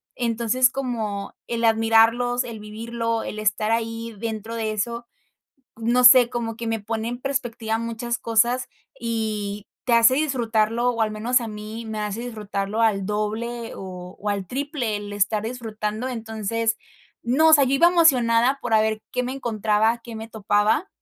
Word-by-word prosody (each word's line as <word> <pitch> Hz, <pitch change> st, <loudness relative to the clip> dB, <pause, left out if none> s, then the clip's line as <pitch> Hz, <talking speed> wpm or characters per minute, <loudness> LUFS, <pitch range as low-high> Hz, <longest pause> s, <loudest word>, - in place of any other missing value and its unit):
Entonces, 240 Hz, +1 st, +2 dB
como 225 Hz, -7 st, -4 dB
el 235 Hz, -1 st, -2 dB
admirarlos, 225 Hz, +2 st, +3 dB
el 230 Hz, -3 st, -7 dB
vivirlo, 230 Hz, +2 st, -3 dB
el 215 Hz, -, -5 dB
estar 215 Hz, +1 st, 0 dB
ahí 230 Hz, 0 st, -2 dB
dentro 220 Hz, 0 st, -4 dB
de 220 Hz, -1 st, -2 dB
eso, 235 Hz, +3 st, -3 dB, 0.7 s
no 240 Hz, +2 st, +1 dB
sé, 245 Hz, -1 st, +8 dB
como 230 Hz, -2 st, -3 dB
que 230 Hz, -, -5 dB
me 225 Hz, -, 0 dB
pone 220 Hz, +2 st, -3 dB
en 245 Hz, +1 st, -5 dB
perspectiva 240 Hz, -5 st, -2 dB
muchas 230 Hz, +1 st, -3 dB
cosas 240 Hz, +3 st, +1 dB, 0.3 s
y 215 Hz, -3 st, -3 dB, 0.2 s
te 245 Hz, -, 0 dB
hace 230 Hz, +2 st, +6 dB
disfrutarlo 240 Hz, -5 st, +1 dB
o 230 Hz, -2 st, -1 dB
al 215 Hz, -, +1 dB
menos 230 Hz, +4 st, +1 dB
a 230 Hz, -, -4 dB
mí, 215 Hz, +2 st, -7 dB
me 220 Hz, -1 st, -5 dB
hace 210 Hz, +1 st, -3 dB
disfrutarlo 215 Hz, -2 st, -3 dB
al 200 Hz, -4 st, +2 dB
doble 225 Hz, +3 st, -3 dB
o 180 Hz, -1 st, -8 dB
o 210 Hz, -, -3 dB
al 200 Hz, -2 st, -2 dB
triple 270 Hz, -, -3 dB
el 205 Hz, 0 st, -7 dB
estar 205 Hz, +1 st, +1 dB
disfrutando, 220 Hz, -1 st, -4 dB
entonces, 225 Hz, -1 st, -2 dB, 0.5 s
no, 275 Hz, +7 st, +4 dB
o -, -, +6 dB
sea, 285 Hz, -2 st, +5 dB
yo 265 Hz, +1 st, +1 dB
iba 335 Hz, +5 st, +6 dB
emocionada 260 Hz, -7 st, +4 dB
por -, -, -3 dB
a 215 Hz, -, +6 dB
ver 220 Hz, 0 st, 0 dB
qué 250 Hz, 0 st, -1 dB
me 255 Hz, -, -3 dB
encontraba, 220 Hz, -3 st, +1 dB
qué 235 Hz, -, -8 dB
me 220 Hz, +1 st, -7 dB
topaba 215 Hz, -, +1 dB
230 Hz, 170 wpm, -23 LUFS, 215-245 Hz, 0.7 s, sé